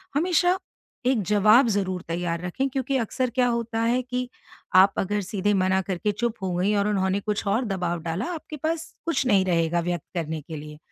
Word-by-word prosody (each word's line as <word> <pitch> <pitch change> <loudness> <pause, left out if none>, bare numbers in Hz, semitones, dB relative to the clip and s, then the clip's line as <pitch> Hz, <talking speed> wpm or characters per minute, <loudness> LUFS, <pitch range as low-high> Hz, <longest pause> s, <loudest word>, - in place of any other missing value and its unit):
हमेशा 355 +3 +3 0.5
एक 250 -4 +3
जवाब 210 +6 +5
ज़रूर 190 -4 -1
तैयार 170 0 -2
रखें 265 +10 -1
क्योंकि 265 +1 -1
अक्सर 250 +2 -1
क्या 250 -1 +3
होता 235 -1 -1
है 240 +2 +2
कि 250 0 -3 0.5
आप 190 +1 +7
अगर 205 +2 0
सीधे 205 +1 0
मना 190 0 +2
करके 190 +3 0
चुप 235 +2 -2
हो 185 -1 -1
गई 190 +4 +1
और 205 0 +2
उन्होंने 190 -1 +1
कुछ 210 0 -2
और 225 +6 +1
दबाव 180 -4 -2
डाला, 170 +6 -2
आपके 310 -1 -7
पास 320 +2 -3
कुछ 330 -5 0
नहीं 200 -5 +4
रहेगा 170 -1 +1
व्यक्त 175 -2 -2
करने 160 -2 -2
के 160 +2 -8
लिए। 150 0 -9
205 Hz, 190 wpm, -25 LUFS, 180-250 Hz, 0.5 s, आप